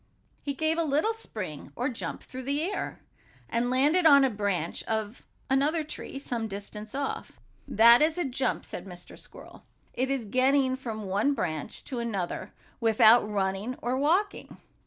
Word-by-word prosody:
He 280 -1 -3
gave 315 +3 0
a - - +2
little 310 +9 +1
spring, 185 - -7
or 245 - -1
jump, 250 -4 -5
through 255 - -8
the 280 +4 -1
air, 395 +4 -3 0.5
and 235 +1 0
landed 295 +7 +4
on 280 -2 +8
the 265 - +3
branch 200 -6 -2
of 220 +1 -3 0.3
another 295 +5 +2
tree, 300 -2 -8
some 240 -5 -3
distance 210 +2 -8
off. 280 0 -4 0.3
"That 235 +4 +7
is 315 +2 +3
a 350 - 0
jump," 260 -1 -1
said 180 - -7
Mr. 175 -1 -10
Squirrel. - - -13 0.3
"It 260 +1 -1
is 270 -4 -1
getting 260 +3 +2
from 225 -5 -6
one 205 +9 +1
branch 155 - -4
to 255 -4 -5
another 205 -7 -3 0.3
without 225 -1 +5
running 200 +4 -1
or 245 +2 -1
walking. 345 +10 0
255 Hz, 160 wpm, -28 LUFS, 210-280 Hz, 0.5 s, on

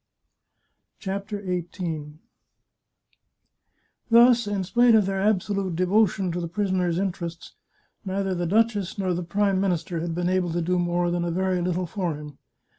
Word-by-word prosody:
CHAPTER 200 +1 -5
XVIII 170 -4 -4 2.0
Thus, 235 -1 +6
in 200 -2 -1
spite 240 +5 +4
of 215 -3 +4
their 195 0 -1
absolute 195 -2 0
devotion 185 +1 +2
to 175 +1 -3
the 170 - -3
pris 200 +3 -2
oner's 180 -2 +1
interests, 175 -3 -4 0.5
neither 195 -1 -2
the 175 -1 -2
duchess 210 -1 +1
nor 190 -2 0
the 175 - -2
Prime 195 +2 +1
Minister 175 -3 -1
had 165 0 -3
been 175 0 -1
able 185 -2 +1
to 175 - 0
do 180 +2 +1
more 175 0 0
than 175 0 -1
a 175 - -1
very 185 +1 0
little 180 +1 -1
for 175 -2 -3
him. 150 -1 -10
185 Hz, 155 wpm, -25 LUFS, 175-200 Hz, 2.0 s, Thus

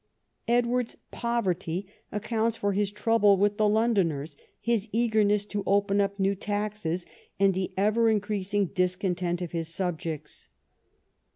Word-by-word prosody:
Edward's 240 0 +1
poverty 190 -6 -1 0.3
accounts 225 +2 -1
for 200 0 0
his 205 0 +1
troubles 210 -1 +3
with 205 +1 +2
the 215 -1 +3
Londoners, 185 -10 +1 0.2
his 230 -2 0
eagerness 215 -3 +2
to 205 0 -3
open 200 0 +3
up 200 0 -1
new 195 +1 +2
taxes, 205 -4 -2 0.3
and 195 -1 +4
the 185 0 -2
ever 215 +3 +3
increasing 205 -1 0
discontent 180 -1 -1
of 175 - -5
his 165 -2 -3
subjects. 165 -3 -4
205 Hz, 125 wpm, -27 LUFS, 185-215 Hz, 0.3 s, and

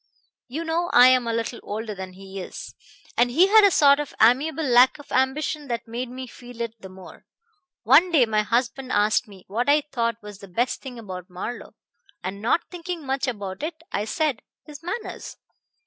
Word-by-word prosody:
You 295 +6 -4
know 335 +2 -1
I 250 +1 +8
am 255 -2 +3
a - - 0
little 230 +1 -3
older 215 +1 -5
than 190 -1 -8
he 195 +1 -9
is, - - -8 0.4
and 245 +1 +3
he 345 +10 +4
had 435 +1 +7
a 405 - +7
sort 285 -5 +5
of 295 - -5
amiable 275 +8 +3
lack 250 -1 +5
of 290 - -15
ambition 285 +3 0
that 235 -2 -4
made 240 +2 -4
me 255 +1 -7
feel 245 -1 -13
it 230 -1 -3
the 190 - -9
more. 185 -1 -14 0.6
One 290 - +5
day 285 -7 +5
my 215 -1 +1
husband 245 +4 -1
asked 210 +1 +2
me 195 -3 -14
what 235 +7 -1
I 295 +1 +4
thought 230 -3 -1
was 205 -2 -10
the 200 - -11
best 235 +8 -1
thing 260 -3 -8
about 185 -5 -8
Marlowe, 185 +7 -7 0.5
and 195 +2 -5
not 245 +10 +2
thinking 345 -3 -6
much 270 +1 -1
about 200 -5 -5
it 315 +2 -3 0.2
I 205 - -1
said, 290 0 -1 0.2
'His 300 -2 -11
manners.' 370 +7 -6
245 Hz, 195 wpm, -24 LUFS, 215-290 Hz, 0.6 s, I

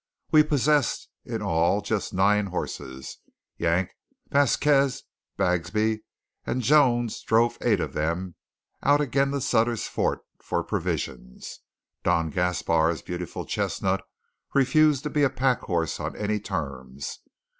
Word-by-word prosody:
We 155 -2 +7
possessed, 150 -2 +1 0.2
in - - -4
all, 85 +5 +2
just 105 0 -2
nine 100 +2 +3
horses. 65 -7 -6 0.4
Yank, 85 +2 +1 0.4
Vasquez, 140 0 +3 0.3
Bagsby, 105 +5 +1 0.4
and 130 - -2
Jones 120 -4 +3
drove 115 +1 +2
eight 110 -5 +2
of - - -3
them 85 +4 -2 0.5
out 145 +1 +4
again 140 -1 +1
to 140 0 -1
Sutter's 115 -2 +1
Fort - - -1 0.2
for - - -2
provisions 60 -2 -4 0.4
Don 80 -1 +1
Gaspar's 85 -2 +1
beautiful 90 -1 -5
chestnut 95 0 -1 0.5
refused 145 +1 +4
to 150 - -3
be 150 - +1
a 140 - +4
pack 130 -1 +1
horse 85 -3 -2
on - - -4
any 105 0 -1
terms. 70 -8 -5
105 Hz, 125 wpm, -26 LUFS, 85-135 Hz, 0.5 s, We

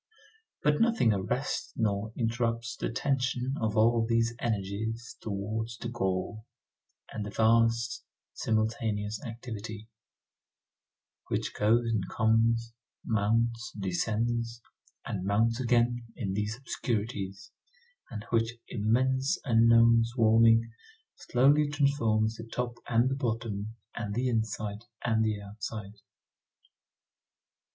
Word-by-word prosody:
But 150 +4 +3
nothing 230 - +4
arrests 120 +8 -2
nor 105 -1 0
interrupts 115 0 -1
the - - -3
tension 130 0 0
of 110 -1 0
all 115 +1 +4
these 115 0 +1
energies 110 +2 -3
toward 110 +2 -3
the 120 - -4
goal, 105 0 -2 0.7
and 110 - -3
the 105 - -5
vast, 115 +2 +2 0.3
simultaneous 110 0 -1
activity, 110 -2 -7 1.4
which - - -2
goes 115 +3 +3
and 110 -5 -1
comes, 115 +1 +2 0.3
mounts, 115 +2 0
descends, 115 +5 -1 0.5
and 95 -3 -3
mounts 110 +4 +2
again 120 -1 +2
in 100 -7 -3
these 105 +3 -2
obscurities, 100 -6 -3 0.6
and 110 -3 -6
which 115 0 +1
immense 130 - +1
unknown 115 -1 +6
swarming 115 -1 +4 0.4
slowly 145 +4 +3
transforms 115 -7 +1
the 115 - -8
top 120 -1 -3
and 115 +1 +3
the 135 - 0
bottom 110 -4 -3 0.2
and 105 -3 -4
the 125 +2 +1
inside 110 -1 -2 0.2
and 110 -1 +2
the 110 -1 0
outside. 105 0 -7
115 Hz, 105 wpm, -29 LUFS, 110-120 Hz, 1.4 s, unknown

